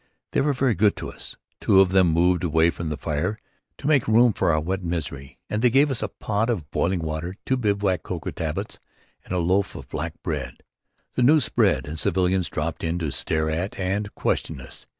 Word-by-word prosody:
They - - +2
were 145 +1 +2
very 130 -2 +2
good 105 +2 +3
to - - -6
us. - - -8 0.2
Two 95 - +4
of 95 -1 +5
them 95 -2 +5
moved 85 +2 +3
away 80 0 +3
from 85 -1 -5
the 75 - -3
fire 75 +8 -2 0.4
to - - -11
make 145 -5 +3
room 115 +1 +5
for 85 - +1
our 80 - +2
wet 95 +4 -2
misery 70 -5 -4
and 105 - -2
they 125 - +5
gave 140 +4 +4
us 130 - -3
a - - 0
pot 105 +3 -2
of 90 -12 -2
boiling 90 0 0
water, 80 +3 -4
two 130 - +2
bivouac 100 -6 +1
cocoa - - -5
tablets - - -4 0.4
and - - -13
a 90 - 0
loaf 90 +3 +1
of - - -8
black 80 +1 -4
bread. 65 -7 -4 0.5
The - - 0
news 145 +4 +5
spread, 95 - +2
and 80 +2 -5
civilians 95 -1 +1
dropped 80 +1 -3
in 85 +1 0
to 80 -5 -2
stare 80 +2 -1
at 85 +5 -3
and 100 +2 -1
question - - -1
us. - - -10
90 Hz, 210 wpm, -24 LUFS, 80-105 Hz, 0.5 s, of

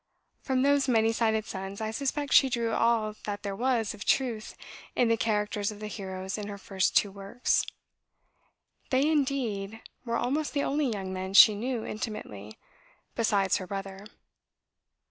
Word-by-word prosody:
From 260 -2 0
those 280 0 +3
many 225 -2 +3
sided 220 -2 +1
sons, 195 0 -6
I 220 0 -2
suspect, 280 +4 -2
she 270 - +7
drew 235 -2 -1
all 225 -2 +2
that 205 -1 -4
there 200 -1 -3
was 235 -2 0
of 210 - -8
truth 235 -5 0 0.4
in 240 - +3
the 230 - +4
characters 210 -2 -1
of 210 - -10
the 215 - -6
heroes 190 -1 -5
in 205 - -5
her 205 -1 -6
first 195 -1 0
two 200 - +3
works. 200 +5 0 1.3
They, 265 +3 +3
indeed, 245 -9 -1 0.2
were 235 -2 -1
almost 290 +5 -1
the 285 -1 0
only 285 -2 0
young 190 -3 -4
men 190 +1 -4
she 215 - +10
knew 235 +2 -3
intimately, 110 - -6 0.6
besides 200 -4 +2
her 185 - -7
brother. 195 +1 -6
220 Hz, 160 wpm, -28 LUFS, 200-245 Hz, 1.3 s, she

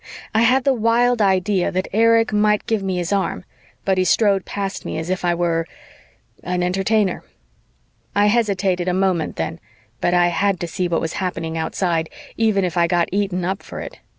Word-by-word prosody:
I 220 - +3
had 250 +3 +4
the 275 - +3
wild 235 0 +2
idea 190 -1 +2
that 185 +1 -2
Erich 230 +1 +3
might 210 0 +2
give 220 -2 0
me 190 -2 -2
his 175 +2 -1
arm, 190 -2 -1 0.4
but 190 -1 +2
he - - +3
strode 195 +2 +2
past 200 -1 -4
me - - -4
as 160 +3 -3
if 185 - -2
I 175 -1 +2
were... 170 -1 0 0.7
an 180 0 -2
Entertainer. 195 +2 0 0.9
I 205 0 +4
hesitated 200 -5 +1
a 180 - +1
moment 185 -4 0
then, 80 0 -4 0.4
but 175 - +1
I 175 0 +4
had 195 +1 0
to 175 - -2
see 180 +2 -2
what 170 -1 0
was 165 - -3
happening 165 -3 -3
outside, 165 0 -1 0.3
even 215 -4 +2
if 180 0 -3
I 170 0 +4
got 175 0 +1
eaten 190 -2 -1
up 190 +2 -2
for - - -9
it. - - -8
190 Hz, 190 wpm, -20 LUFS, 175-210 Hz, 0.9 s, had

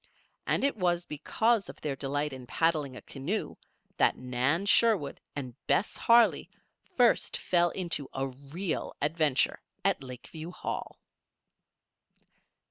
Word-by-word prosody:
And - - +1
it 280 - +2
was 175 -3 +1
because 220 +8 0
of - - -10
their 145 -3 -3
delight 145 +2 -2
in 130 -2 -9
paddling 155 -3 0
a - - -10
canoe 155 +11 -3 0.4
that - - +3
Nan 130 +8 0
Sherwood 205 -8 +3 0.2
and 130 -4 -5
Bess 205 - +2
Harley 235 0 +4 0.5
first 245 -2 +3
fell 175 -1 +2
into 170 -7 -3
a 135 0 -2
real 140 +7 -4
adventure 150 -2 +1 0.2
at 195 -6 +2
Lakeview 135 +6 -8
Hall. 180 - -5
155 Hz, 125 wpm, -29 LUFS, 135-185 Hz, 0.5 s, Harley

